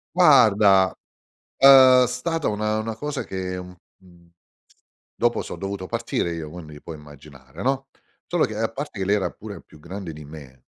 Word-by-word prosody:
Guarda 105 - +5 0.6
è 130 -2 +7
stata 145 +6 -2
una 105 +1 -1
una 110 0 -4
cosa 145 +3 -4
che 95 -1 -5
un 90 0 -9 0.3
un 85 -2 -21 0.8
dopo 120 0 0
so' - - -7
dovuto 95 -1 -5
partire 85 0 -2
io, 80 -2 -6
quindi 75 -3 -11
puoi 80 - -9
immaginare, 75 +1 -14
no. 135 +2 -1 0.4
Solo 175 -2 +1
che 110 - -7
a 115 +1 -1
parte 135 -1 -7
che 95 - -2
lei 100 +2 +2
era 95 -3 -2
pure - - -10
più 75 - -19
grande 90 +1 -8
di 75 0 -11
me, 70 -4 -13
95 Hz, 165 wpm, -23 LUFS, 80-125 Hz, 0.8 s, è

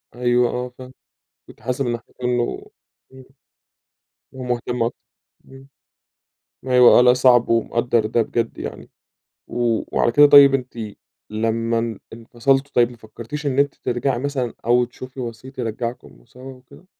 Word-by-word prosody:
أيوه 120 0 +2
آه، 125 0 -4
فاهم، 130 0 -11 0.5
كنتِ - - -17
حاسة 125 +4 -2
من 120 - -1
ناحية 120 0 -7
إنه 125 -1 -1 0.5
امم، 130 0 -13 1.1
ومهتم 125 -2 -3
أكت 115 - -2 0.5
امم، 135 0 -15 1.0
أيوه 125 -2 +6
آه، - - +7
لأ 125 0 +6
صعب 125 -1 +4
ومقدر 115 0 +1
ده 115 +2 +1
بجد 115 +1 -2
يعني، - - -8 0.6
و 120 -2 -1
وعلى 120 - +2
كده 145 +4 +7
طيب 140 -1 +8
أنتِ 130 -2 -3 0.5
لمّا 115 +1 -1
ان 115 -1 -4
انفصلتم 125 +5 -1
طيب 120 0 +3
ما 120 - -14
فكرتِيش 115 +7 -9
إن 135 -1 0
أنتِ 140 0 +1
ترجعي 120 +1 -2
مثلًا 130 -4 -3
أو 120 +1 +3
تشوفي 130 +2 -11
وسيط 125 +2 -8
يرجعكم 115 - -6
سوا 130 +1 -12
وكده؟ 130 +7 -18
125 Hz, 145 wpm, -21 LUFS, 115-130 Hz, 1.1 s, طيب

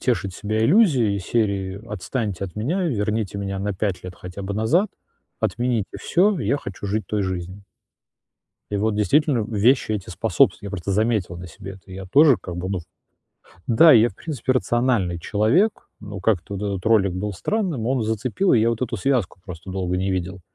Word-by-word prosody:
тешить 100 -7 -1
себя 110 +1 -2
иллюзией 135 - +4
из 100 - -5
серии: 100 -3 -1
"Отстаньте 105 -1 -3
от 95 +1 -9
меня, 160 - -1
верните 105 - -1
меня 100 -1 -3
на 105 0 -1
5 95 -1 -2
лет 90 0 -8
хотя 90 +2 -8
бы 100 +1 -4
назад". 120 - +2 0.5
Отмените 120 -4 0 0.2
всё, 195 +3 +2
я 140 - +1
хочу 100 -5 -7
жить 105 +2 -2
той 105 -2 -1
жизнью. 95 +1 -4 1.1
И 105 - -1
вот, 105 +1 0
действительно, 125 - +2
вещи 115 +2 +2
эти 100 -4 -4
способствуют. 90 - +2
Я 100 - -6
просто 100 0 -3
заметил 105 -4 0
на 90 +1 -8
себе 95 +3 -9
это. 95 0 -15
Я 95 0 -7
тоже, 140 - +6
как 90 -2 -7
бы, 90 +2 -4
ну, 95 - -1
в - - -15 0.8
Да, 150 +7 +7
и 115 - +8
я, 115 - +4
в 95 - -15
принципе, 135 -5 -2
рациональный 120 -8 +1
человек, 110 - +1
но 105 -2 -7
как-то 100 -2 0
вот 100 - -5
этот 100 -1 -3
ролик 100 -5 +4
был 100 +3 -3
странным, 165 - -2
он 130 -2 +1
зацепил, 120 - 0
и 115 - +5
я 115 +1 +3
вот 115 +2 -3
эту 115 -2 -2
связку 115 -5 0
просто 90 0 -9
долго 90 -1 -2
не 95 +1 -1
видел. 95 +1 -3
105 Hz, 195 wpm, -22 LUFS, 95-120 Hz, 1.1 s, и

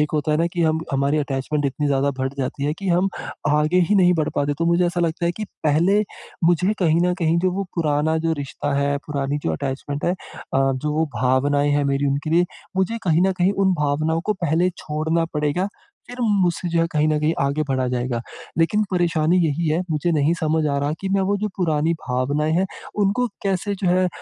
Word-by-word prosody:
एक 150 - +1
होता 150 0 +1
है 150 - +3
न - - +2
कि 175 - 0
हम 160 0 +2
हमारी 140 +3 +1
अटैचमेंट 145 +1 -2
इतनी 140 +2 -2
ज़्यादा 140 0 +2
बढ़ 130 +1 -1
जाती 135 +1 -2
है 150 - +1
कि 195 - -4
हम 180 +2 +3 0.4
आगे 150 +4 +3
ही 210 - +3
नहीं 180 -3 +5
बढ़ 155 -3 0
पाते। 145 0 0
तो 165 - +1
मुझे 170 +1 +3
ऐसा 175 0 -1
लगता 170 0 0
है 170 - +1
कि 215 - -3 0.2
पहले 170 +7 +3 0.4
मुझे 175 +4 +3
कहीं 165 -2 +3
न 180 - +1
कहीं 165 0 +2
जो 185 +2 +1
वो 195 +2 -2
पुराना 155 -1 +1
जो 165 0 0
रिश्ता 145 -1 -3
है, 140 0 +1
पुरानी 140 -1 -2
जो 80 - 0
अटैचमेंट 140 - -4
है 175 - +2
अ, 135 -6 -2
जो 150 +3 -2
वो 160 +1 +1
भावनाएँ 140 +3 +2
हैं 145 0 +2
मेरी 140 0 +1
उनके 140 +3 -1
लिए, 175 +2 +4 0.3
मुझे 190 +5 0
कहीं 170 -1 +3
न 190 - +2
कहीं 185 +1 +2
उन 190 - +4
भावनाओं 155 +2 0
को 215 - +1
पहले 170 +3 +2
छोड़ना 160 +2 -1
पड़ेगा। 150 +6 0 0.4
फिर 245 - -9
मुझसे 190 -6 +1
जो 165 0 +1
है 165 - +2
कहीं 150 0 +2
न 155 -1 +2
कहीं 155 +2 +2
आगे 140 +2 +1
बढ़ा 130 -1 0
जाएगा। 125 -1 -2 0.4
लेकिन 165 +6 +3
परेशानी 170 -1 +2
यही 155 +2 -1
है, 160 +3 +1
मुझे 155 +3 0
नहीं 155 +2 +2
समझ 160 0 +1
आ 140 - 0
रहा 145 +2 -1
कि 195 - -3
मैं 195 0 +2
वो 205 - +2
जो 210 +1 -2
पुरानी 160 -2 +1 0.2
भावनाएँ 140 +5 0
हैं, 190 +2 +2 0.4
उनको 205 +6 +1 0.2
कैसे 195 +1 -1
जो 185 - +2
है 185 +1 +3
अ, - - 0
155 Hz, 225 wpm, -22 LUFS, 145-175 Hz, 0.4 s, नहीं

